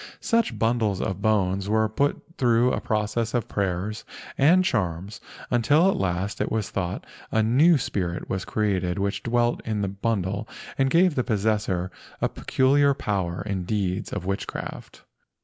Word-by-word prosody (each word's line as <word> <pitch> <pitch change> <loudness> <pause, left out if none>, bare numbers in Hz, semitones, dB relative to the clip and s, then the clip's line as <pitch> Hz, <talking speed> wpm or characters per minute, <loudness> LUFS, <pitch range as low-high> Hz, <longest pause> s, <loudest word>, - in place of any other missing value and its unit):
Such 230 - +1
bundles 115 -3 +1
of 95 - -3
bones 100 -2 +1
were 110 0 +3
put 140 +7 0 0.2
through 120 0 +3
a - - -1
process 110 +2 -1
of 120 - 0
prayers 100 +2 -2 0.3
and 175 +7 +5
charms 100 - -2 0.3
until 145 - +4
at - - -2
last 95 +2 -2
it - - -1
was 110 -3 -1
thought 90 -2 -3 0.3
a 110 - +2
new 145 +9 +5
spirit 90 -8 -3
was 95 -1 -2
created 95 -4 -1
which 100 0 -1
dwelt 120 0 +1
in 110 -2 -2
that 100 0 -4
bundle 105 -1 -1 0.3
and 135 0 +2
gave 175 +3 +4
the 125 - 0
possessor 105 -4 0 0.3
a - - +2
peculiar 140 +1 +2
power 95 -5 -2
in 100 -3 -2
deeds 95 -2 -2
of 90 - -4
witchcraft. 95 +1 -5
105 Hz, 155 wpm, -25 LUFS, 95-120 Hz, 0.3 s, and